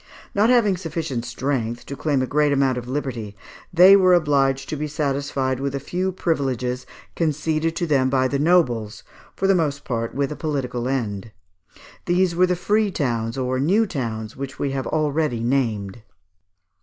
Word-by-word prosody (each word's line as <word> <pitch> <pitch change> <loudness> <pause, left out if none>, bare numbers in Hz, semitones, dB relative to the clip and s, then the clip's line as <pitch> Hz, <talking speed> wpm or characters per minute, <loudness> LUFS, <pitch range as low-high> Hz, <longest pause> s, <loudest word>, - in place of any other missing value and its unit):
Not 210 +3 +3
having 220 -7 +4
sufficient 160 -8 -4
strength 120 -2 -3
to 140 - -6
claim 140 -2 0
a - - +1
great 150 +2 +2
amount 135 -2 +2
of 125 -1 -6
liberty, 125 -7 -4 0.3
they 180 +3 +8
were 185 -2 +5
obliged 135 -4 +1
to - - -2
be 150 +1 -3
satisfied 140 -3 -1
with 140 0 -2
a - - -2
few 180 +7 -2
privileges, 130 -8 -2 0.3
conceded 160 0 0
to 175 - -1
them 135 -5 +2
by 130 -1 +2
the 140 +1 -1
nobles, 125 -10 +1 0.3
for 195 - -2
the 195 - +5
most 150 -5 0
part 115 -2 -3
with 140 +1 -1
a - - -4
political 125 -6 -3
end. 110 -6 -3 0.8
These 180 0 +2
were 185 +1 +4
the 180 - +1
Free 210 +4 +1
Towns 120 -8 -2
or 130 0 -1
New 195 +11 +3
Towns 115 - -4
which 135 0 -6
we 140 - -1
have 135 -1 -3
already 150 -5 0
named. 115 -5 -1
140 Hz, 170 wpm, -22 LUFS, 125-165 Hz, 0.8 s, they